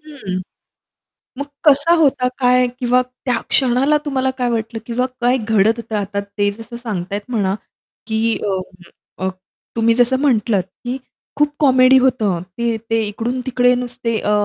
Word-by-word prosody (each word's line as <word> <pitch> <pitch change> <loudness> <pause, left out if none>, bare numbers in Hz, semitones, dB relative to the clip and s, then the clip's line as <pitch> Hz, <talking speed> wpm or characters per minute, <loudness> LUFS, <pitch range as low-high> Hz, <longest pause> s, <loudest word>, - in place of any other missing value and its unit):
हं. 255 -12 -6 1.0
मग 285 - -3 0.2
कसा 295 +3 +5
होता 270 -5 +3
काय 250 -1 +4
किंवा 250 0 +3
त्या 250 -1 -3
क्षणाला 265 +3 +3
तुम्हाला 265 -3 0
काय 245 -1 0
वाटलं 225 0 -2
किंवा 250 +1 0
काय 245 +2 +3
घडत 220 -2 +3
होतं? 230 -1 -7
आता 200 0 -2
ते 200 0 -1
जसं 230 +1 -8
सांगतायत 205 -4 -4
म्हणा 200 -5 0 0.5
की 225 0 0
अ, 200 - 0 0.7
अ, - - +1 0.5
तुम्ही 230 0 +3
जसं 245 +2 +3
म्हटलत 225 -8 +2 0.2
की 245 +1 -2 0.4
खूप 295 0 +2
कॉमेडी 260 -2 +6
होतं 225 -9 +1 0.2
ते 235 -1 0
ते 225 0 +2
इकडून 235 +5 -3
तिकडे 250 -1 +3
नुसते 245 -2 -3
अ, - - -1
245 Hz, 150 wpm, -19 LUFS, 220-255 Hz, 1.0 s, कॉमेडी